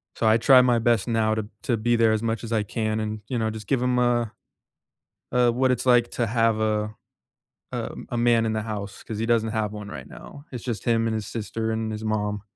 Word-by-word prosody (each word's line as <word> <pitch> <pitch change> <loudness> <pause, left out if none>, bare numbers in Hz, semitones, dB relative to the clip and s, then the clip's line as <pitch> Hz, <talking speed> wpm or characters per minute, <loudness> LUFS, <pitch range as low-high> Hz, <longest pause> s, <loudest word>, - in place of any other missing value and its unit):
So, 115 - +1
I 110 +1 +5
try 130 +3 +7
my 120 -2 +3
best 115 -2 +2
now 110 -1 +1
to 110 -1 -3 0.2
to 120 - 0
be 120 +2 +1
there 115 -1 +4
as 110 -1 +1
much 115 -1 -2
as 115 - -6
I 110 -2 +1
can 110 +1 -2
and, 110 0 -3
you 130 - -2
know, 110 - 0
just 110 -2 -7
give 130 0 +1
him 125 0 +1
a 120 -2 +2 1.0
a 125 0 +4
what 130 +2 +1
it's 125 0 -1
like 120 -1 +4
to 120 - 0
have 115 -1 +2
a 105 0 0 0.8
a - - -4 0.2
a 120 - -2
man 115 -1 +3
in 110 - 0
the 110 - -1
house 105 -2 -6
'cause 110 - -6
he 115 - -1
doesn't 115 -1 +2
have 110 -2 -1
one 105 -1 -7
right 65 -8 -8
now. 140 - -12
It's 125 -3 -7
just 120 -4 -4
him 115 -1 +2
and 115 - 0
his 110 -3 -3
sister 110 0 -3
and 110 0 -2
his 110 +1 -5
mom. 105 -1 -1
115 Hz, 245 wpm, -25 LUFS, 110-120 Hz, 1.0 s, try